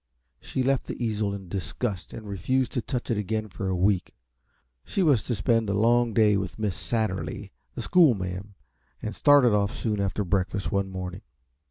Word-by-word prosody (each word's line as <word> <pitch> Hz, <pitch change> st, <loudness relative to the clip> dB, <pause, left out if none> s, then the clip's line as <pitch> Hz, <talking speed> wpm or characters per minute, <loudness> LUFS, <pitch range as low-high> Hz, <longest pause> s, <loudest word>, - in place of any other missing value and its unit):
She 130 Hz, -, -2 dB
left 135 Hz, 0 st, +1 dB
the -, -, -5 dB
easel 110 Hz, -3 st, -1 dB
in 100 Hz, -2 st, -6 dB
disgust 95 Hz, -, -4 dB
and 110 Hz, -2 st, -8 dB
refused 125 Hz, +6 st, 0 dB
to 125 Hz, -, -1 dB
touch 125 Hz, 0 st, -3 dB
it 110 Hz, -, +1 dB
again 110 Hz, +1 st, -2 dB
for 95 Hz, +1 st, -5 dB
a 95 Hz, -, 0 dB
week. 95 Hz, 0 st, +1 dB, 0.7 s
She 195 Hz, -, -1 dB
was 140 Hz, -9 st, +4 dB
to 120 Hz, -, -2 dB
spend 110 Hz, +2 st, +1 dB
a 100 Hz, -, +1 dB
long 120 Hz, +2 st, +3 dB
day 105 Hz, -2 st, +4 dB
with 95 Hz, -1 st, -4 dB
Miss 105 Hz, -5 st, -1 dB
Satterly, 110 Hz, -3 st, -2 dB, 0.2 s
the -, -, -4 dB
schoolma'am, 100 Hz, -, +2 dB, 0.5 s
and 110 Hz, -, -3 dB
started 145 Hz, -6 st, +5 dB
off 105 Hz, +3 st, +1 dB
soon 105 Hz, -3 st, -1 dB
after 100 Hz, +1 st, -1 dB
breakfast 95 Hz, +1 st, -1 dB
one 100 Hz, -1 st, 0 dB
morning. 95 Hz, 0 st, -6 dB
105 Hz, 180 wpm, -26 LUFS, 95-120 Hz, 0.7 s, started